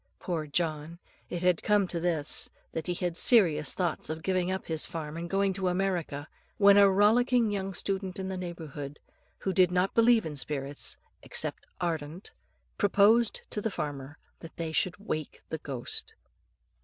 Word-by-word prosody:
Poor 165 -4 -3
John! 155 +1 -2 0.3
it 175 0 -4
had 180 -2 +3
come 205 -2 +3
to 170 - -1
this, 165 -4 -1 0.2
that 160 - -4
he 175 - -1
had 175 -1 -2
serious 165 - +4
thoughts 175 -5 -2
of 160 0 -5
giving 185 -1 0
up 190 0 -3
his 160 -1 -1
farm 155 -2 -5
and 170 +1 -5
going 195 0 +1
to 190 0 -2
America, 180 -6 -1 0.3
when 200 -1 +7
a 200 -1 +7
rollicking 225 +4 +4
young 195 -1 -2
student 190 0 -2
in 190 -1 -4
the 190 - -3
neighbourhood, 155 -5 -6 0.4
who 190 - -2
did 185 -2 +4
not 180 +2 +1
believe 230 -2 +5
in 155 -2 -5
spirits 140 0 -3 0.2
except - - -2
ardent 165 +1 -3 0.5
proposed 210 +3 +4
to 210 - -3
the 220 - -1
farmer 145 -4 -5 0.2
that 165 - -12
they 165 -1 -3
should 175 +2 0
"wake 155 -7 -5
the 160 - -4
ghost." 135 -5 +1
180 Hz, 165 wpm, -29 LUFS, 155-195 Hz, 0.5 s, when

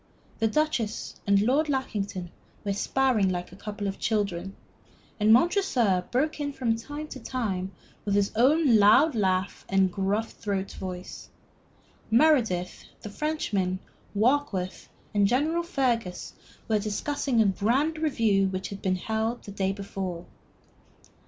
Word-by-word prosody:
The 225 - +3
Duchess 260 -4 -1
and 200 0 +5
Lord 285 +7 +2
Lackington 205 -9 -2 0.3
were 200 - 0
sparring 225 -1 +2
like 180 -1 -3
a - - -11
couple 205 +1 -6
of 195 0 -3
children, 195 -4 -1 0.6
and 215 +1 +4
Montresor 245 - +3
broke 300 +5 0
in 285 -1 -2
from 235 -4 0
time 290 +6 -7
to 265 - -7
time 200 -7 -3 0.3
with 200 -1 0
his 200 0 +1
loud 260 0 +5
laugh 190 -3 0
and 190 -1 +3
gruff 200 +4 -1
throat 195 -2 -3
voice. 185 -1 -7 0.8
Meredith, 225 - +2 0.2
the 210 - -7
Frenchman, 205 -11 -1 0.4
Warkworth, 215 -5 0 0.3
and 205 -1 +4
General 305 +9 +1
Fergus 245 - -1 0.3
were 220 -2 +2
discussing 235 +5 -1
a 220 - +5
grand 255 +11 +1
review 225 -11 +2
which 190 0 -4
had 200 0 -8
been 185 -1 +1
held 220 +5 -2
the 200 - -9
day 195 -1 0
before. 195 -3 -5
215 Hz, 135 wpm, -27 LUFS, 195-265 Hz, 0.8 s, and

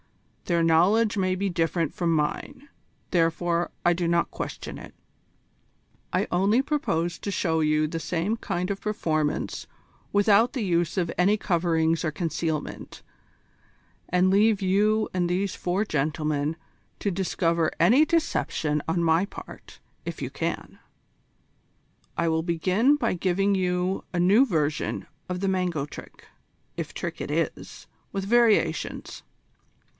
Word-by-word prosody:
Their 170 -2 +1
knowledge 195 +8 +4
may 185 -2 +1
be 200 +2 -1
different 165 -2 0
from 170 -2 0
mine, 260 - -2 0.4
therefore 170 0 +1 0.2
I 175 - +5
do 175 0 -2
not 170 0 +1
question - - -6
it. - - -11 1.2
I - - 0
only 200 +7 +3
propose 175 - -1
to 200 - -4
show 160 -4 0
you 155 0 +2
the 165 +2 -4
same 180 +7 -1
kind 180 -5 -3
of 195 - -4
performance 155 -8 -1 0.5
without 205 +3 +4
the 255 -6 -3
use 175 -2 0
of 175 -3 0
any 195 +4 +3
coverings 165 -4 +1
or 155 - 0
concealment, 160 -1 -4 1.1
and 180 +1 +3
leave 205 +1 +3
you 210 +3 +2
and 175 -1 0
these 190 +2 -1
four 185 +4 -1
gentlemen 150 -1 -1 0.4
to 200 - -1
discover 170 -3 0
any 235 - +6
deception 235 - 0
on 170 +1 +1
my 165 +3 +3
part - - -12 0.2
if - - -6
you - - -3
can. - - -4 1.4
I 170 - +1
will 160 0 +1
begin 185 - +2
by - - 0
giving 195 +3 +1
you 180 0 0
a 175 - 0
new 200 +9 +5
version 155 - -1 0.2
of 180 0 -2
the 195 - -1
mango 180 -6 0
trick, 150 - -12 0.5
if - - -5
trick - - -5
it - - -4
is, - - -3 0.2
with 195 -1 -3
variations. 235 0 +1
180 Hz, 135 wpm, -26 LUFS, 165-200 Hz, 1.4 s, any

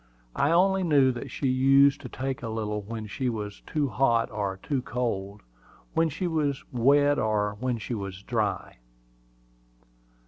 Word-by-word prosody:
I 140 - +2
only 190 +3 +3
knew 145 -7 +4
that 130 +2 -6
she 135 - -2
used 135 +2 +4
to - - -8
take 135 0 -4
a 115 - -4
little 105 -1 -3
when 110 +1 -6
she 125 +5 -2
was 105 -3 -5
too 150 -3 0
hot 120 -2 +2
or 100 -3 -3
too 140 -4 -1
cold, 105 -6 -3 0.5
when 165 0 +2
she 155 +6 -4
was 150 -5 -1
wet 145 +4 +3
or 105 -1 0
when 125 -1 -1
she 115 +2 -5
was 100 -3 -6
dry. 110 -4 -2
125 Hz, 160 wpm, -27 LUFS, 105-140 Hz, 0.5 s, knew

